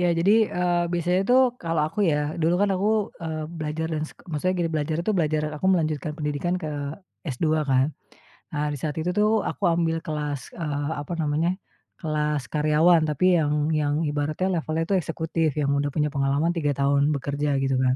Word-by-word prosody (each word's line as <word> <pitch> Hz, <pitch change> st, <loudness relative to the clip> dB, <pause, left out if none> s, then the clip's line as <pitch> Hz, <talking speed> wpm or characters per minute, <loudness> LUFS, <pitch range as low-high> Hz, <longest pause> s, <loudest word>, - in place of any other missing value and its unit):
Ya, 180 Hz, -, +3 dB
jadi, 195 Hz, +5 st, +4 dB
eee, 175 Hz, -1 st, +1 dB
biasanya 175 Hz, +2 st, +1 dB
tuh 255 Hz, +1 st, +6 dB, 0.2 s
kalau 165 Hz, -2 st, 0 dB
aku 210 Hz, -, -4 dB
ya, 150 Hz, 0 st, 0 dB
dulu 165 Hz, +2 st, +3 dB
kan 205 Hz, -, +2 dB
aku, 190 Hz, +2 st, +1 dB, 0.4 s
ee, 160 Hz, -1 st, -3 dB, 0.2 s
belajar 155 Hz, +1 st, -2 dB
dan 155 Hz, -1 st, -1 dB
sek -, -, -17 dB
maksudnya 180 Hz, +5 st, 0 dB
gini, 165 Hz, -, -1 dB
belajar 155 Hz, +1 st, -1 dB
tuh, 215 Hz, -, +2 dB
belajar 155 Hz, -2 st, +1 dB
aku 170 Hz, -, -2 dB
melanjutkan 155 Hz, -4 st, +1 dB
pendidikan 150 Hz, +3 st, -1 dB
ke 155 Hz, -, -3 dB, 0.7 s
S2 145 Hz, -, -2 dB, 0.3 s
kan. 135 Hz, +3 st, +3 dB, 0.6 s
Nah, 150 Hz, 0 st, 0 dB
di 145 Hz, -, -3 dB
saat 150 Hz, +2 st, -3 dB
itu 175 Hz, -, -1 dB
tuh 215 Hz, +1 st, +3 dB
aku -, -, -5 dB
ambil 165 Hz, -1 st, +1 dB
kelas, 150 Hz, -4 st, -4 dB
eeh, 145 Hz, -3 st, -3 dB
apa 150 Hz, -, -6 dB
namanya, 160 Hz, +3 st, 0 dB, 0.4 s
kelas 150 Hz, -5 st, -1 dB
karyawan 155 Hz, +4 st, +4 dB
tapi 175 Hz, +4 st, +3 dB
yang 150 Hz, -2 st, +1 dB, 0.2 s
yang 150 Hz, -1 st, +1 dB
ibaratnya 150 Hz, +5 st, -1 dB
levelnya 160 Hz, 0 st, -1 dB
itu 200 Hz, -, +3 dB
eksekutif 160 Hz, -1 st, -1 dB
yang 145 Hz, -1 st, 0 dB
udah 145 Hz, 0 st, -1 dB
punya 150 Hz, -1 st, +1 dB
pengalaman 140 Hz, +3 st, +1 dB
3 150 Hz, -4 st, 0 dB
tahun 140 Hz, +1 st, +3 dB
bekerja, 140 Hz, +1 st, -1 dB
gitu 135 Hz, -1 st, +1 dB
kan. 130 Hz, -1 st, +3 dB
155 Hz, 185 wpm, -25 LUFS, 145-170 Hz, 0.7 s, tuh